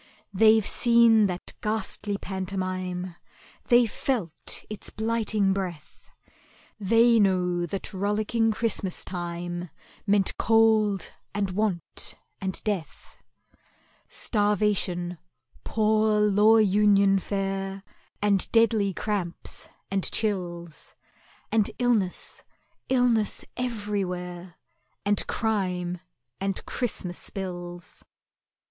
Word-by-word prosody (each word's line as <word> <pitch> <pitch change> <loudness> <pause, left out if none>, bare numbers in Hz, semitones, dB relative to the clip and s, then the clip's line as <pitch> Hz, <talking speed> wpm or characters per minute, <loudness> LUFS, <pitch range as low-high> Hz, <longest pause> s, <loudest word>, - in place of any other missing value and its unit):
They've 220 +1 +5
seen 235 -3 +5
that 180 -1 -5
ghastly 210 -1 -1
pantomime, 185 -2 -4 0.5
They've 240 -1 +5
felt 215 - -2
its 215 -1 -6
blighting 220 -3 0
breath, 180 -6 -6 0.7
They 230 +3 +4
know 180 -3 +2
that 195 +4 -5
rollicking 215 +3 +1
Christmas 210 -4 -1
time 175 -1 -5 0.4
Meant 200 -1 +3
Cold 220 -3 +3 0.2
and 200 -2 0
Want 190 -4 -1 0.3
and 190 -1 -3
Death,— 200 -6 -4 0.9
Starvation—Poor 210 - 0
Law 210 +2 +5
Union 200 -1 +4
fare— 195 0 -3 0.4
And 200 -2 +2
deadly 220 -4 +3
cramps 195 -5 -4 0.2
and 195 -1 0
chills, 175 -6 -3 0.6
And 215 -2 +2
illness—illness 240 +1 0
everywhere, 190 -7 -3 0.5
And 205 0 +1
crime, 180 -5 -1 0.4
and 195 0 -2
Christmas 185 -7 -3
bills. 175 -2 -7
200 Hz, 80 wpm, -26 LUFS, 180-215 Hz, 0.9 s, They've